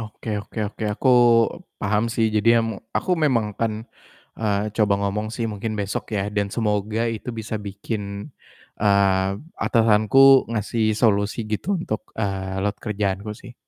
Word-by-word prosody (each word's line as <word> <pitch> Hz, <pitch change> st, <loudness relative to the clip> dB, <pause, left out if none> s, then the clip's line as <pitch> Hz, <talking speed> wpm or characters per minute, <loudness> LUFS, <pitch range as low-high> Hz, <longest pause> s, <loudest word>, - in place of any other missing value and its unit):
Oke 110 Hz, +1 st, -9 dB
oke 110 Hz, -, -10 dB
oke 110 Hz, -, -10 dB
aku 130 Hz, -, 0 dB, 0.7 s
paham 105 Hz, +2 st, +1 dB
sih, 115 Hz, -3 st, +2 dB
jadi 105 Hz, +1 st, +2 dB
em 115 Hz, 0 st, 0 dB, 0.3 s
aku -, -, -4 dB
memang 120 Hz, -7 st, +2 dB
kan, 115 Hz, -1 st, +1 dB, 0.7 s
eee, 105 Hz, -1 st, -1 dB
coba 105 Hz, -2 st, +3 dB
ngomong 100 Hz, +2 st, -1 dB
sih 115 Hz, -, -2 dB
mungkin 105 Hz, +2 st, -4 dB
besok 100 Hz, 0 st, -3 dB
ya 100 Hz, -, 0 dB
dan 100 Hz, 0 st, +2 dB
semoga 105 Hz, -1 st, -1 dB
itu 110 Hz, -, -9 dB
bisa 110 Hz, 0 st, -5 dB
bikin, 100 Hz, +2 st, -4 dB, 0.8 s
eee, 100 Hz, -2 st, +3 dB, 0.4 s
atasanku 110 Hz, +1 st, +3 dB, 0.3 s
ngasih 110 Hz, 0 st, -1 dB, 0.2 s
solusi 100 Hz, -1 st, +2 dB
gitu 105 Hz, -, -2 dB
untuk, 110 Hz, -10 st, -3 dB, 0.2 s
eee, 95 Hz, -2 st, -2 dB
load 100 Hz, 0 st, -1 dB
kerjaanku 100 Hz, -1 st, -2 dB
sih. 120 Hz, -, -12 dB
105 Hz, 145 wpm, -23 LUFS, 100-110 Hz, 0.8 s, coba